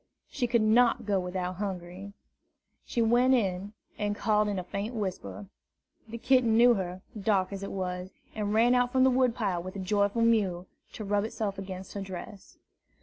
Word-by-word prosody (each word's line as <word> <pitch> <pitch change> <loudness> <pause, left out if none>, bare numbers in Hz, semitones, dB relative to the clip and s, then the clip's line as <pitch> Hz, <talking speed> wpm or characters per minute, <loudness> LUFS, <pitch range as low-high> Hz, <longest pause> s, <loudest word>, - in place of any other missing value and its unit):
She 245 - -1
could 235 -2 +2
not 235 +1 +3
go 200 -2 +1
without 180 0 -3
Hungry. 190 0 -6 0.7
She 235 - 0
went 245 +3 +4
in, 195 -3 -1 0.3
and 205 -1 -1
called 210 0 +2
in 205 -1 -2
a 185 - -3
faint 200 +6 -5
whisper. 105 - -4 0.6
The 230 +1 -7
kitten 240 -2 +3
knew 240 +1 +7
her, 185 -3 -4 0.2
dark 195 -2 +1
as 195 - -5
it 195 - -5
was, 180 -1 -4 0.2
and 210 -1 -2
ran 230 +3 +4
out 245 0 +2
from 260 0 +3
the 260 - +5
wood 250 -2 +2
pile 195 -6 -1
with 185 +2 -8
a - - -5
joyful 205 +4 +1
mew, 200 -6 +2 0.3
to 215 - -6
rub 205 0 +1
itself 210 -3 -3
against 190 -1 -7
her 200 - -4
dress. 195 +2 -9
205 Hz, 185 wpm, -29 LUFS, 185-230 Hz, 0.7 s, knew